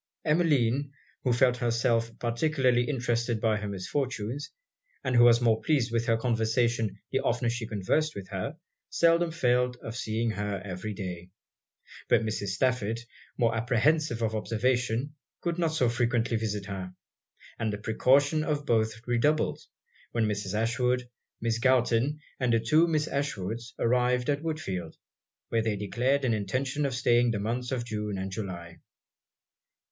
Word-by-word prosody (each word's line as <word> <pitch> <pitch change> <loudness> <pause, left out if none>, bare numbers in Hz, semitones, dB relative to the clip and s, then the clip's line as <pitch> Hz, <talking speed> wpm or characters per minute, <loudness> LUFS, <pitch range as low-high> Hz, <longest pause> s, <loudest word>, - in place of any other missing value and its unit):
Emmeline, 145 -4 +2 0.3
who 125 - +2
felt 125 +1 +3
herself 115 -1 0
particularly 125 0 +1
interested 120 -3 0
by 110 0 +2
her 105 0 -4
misfortunes, 120 +5 -3 0.5
and 130 -2 0
who 120 - +7
was 120 0 +6
more 115 -2 +3
pleased 135 -7 +1
with 115 +1 0
her 115 -1 +3
conversation 115 -2 0
the 135 - +1
oftener 120 -1 0
she 115 -1 -4
conversed 115 +10 0
with 100 -2 -7
her, 100 - -4 0.3
seldom 170 0 +3
failed 125 -5 +1
of 115 - -6
seeing 115 -1 -1
her 105 -1 -3
every 100 +2 -5
day: 90 -2 -6 0.8
but - - +4
Mrs. 110 -2 -2
Stafford, 115 +2 0 0.4
more 115 -1 +2
apprehensive 120 +2 +1
of 110 -1 0
observation, 120 +4 0 0.3
could 170 0 -2
not 165 -2 +2
so 145 -6 +2
frequently 120 -1 +1
visit 105 -2 -2
her; 95 -2 -6 0.6
and 110 -1 0
the 105 - -3
precaution 140 +8 +3
of 150 -2 -1
both 110 -2 0
redoubled, 135 +6 +1 0.5
when 115 -1 +2
Mrs. 105 -1 -2
Ashwood, 120 +3 +1 0.3
Miss 115 0 0
Galton, 130 +3 +2 0.2
and 125 -2 +1
the 115 - +4
two 155 +9 +4
Miss 155 -2 +1
Ashwood's, 115 -4 -3
arrived 125 +2 +2
at 145 0 -1
Woodfield, 95 - -4 0.5
where 115 - +1
they 110 -1 0
declared 125 +7 0
an 120 - +2
intention 130 +8 -1
of 130 - -3
staying 120 -1 +3
the 110 -3 -1
months 120 +4 -2
of 125 -2 -2
June 105 -3 -3
and 95 0 -4
July. 85 -4 -6
120 Hz, 150 wpm, -28 LUFS, 110-130 Hz, 0.8 s, who